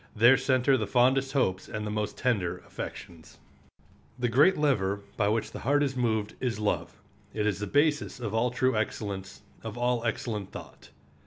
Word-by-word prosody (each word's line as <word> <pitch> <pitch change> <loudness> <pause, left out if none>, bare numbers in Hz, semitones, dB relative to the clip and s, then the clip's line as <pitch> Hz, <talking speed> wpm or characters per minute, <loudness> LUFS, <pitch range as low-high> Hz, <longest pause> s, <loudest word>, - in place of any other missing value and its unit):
There 120 +4 +7
center 130 0 +2
the 110 - -2
fondest 130 +2 +3
hopes 95 -9 0
and 105 0 -4
the 105 - -3
most 105 -1 -3
tender 105 -9 0
affections. 80 -3 -9 0.8
The 125 -1 0
great 145 +11 +5
lever 100 -10 +1
by 100 - +1
which 110 +1 -1
the - - -7
heart 145 +3 +2
is 135 -2 -1
moved 110 -4 0
is 120 -5 -1
love; 105 -1 -2 0.4
it 105 -1 0
is 105 -2 0
the 105 - -3
basis 145 +3 +1
of 110 -4 -4
all 115 +2 +2
true 130 +1 +1
excellence, 100 -3 -4 0.2
of - - -6
all 120 -1 0
excellent 115 -4 -3
thought. - - -11
115 Hz, 175 wpm, -28 LUFS, 105-130 Hz, 0.8 s, There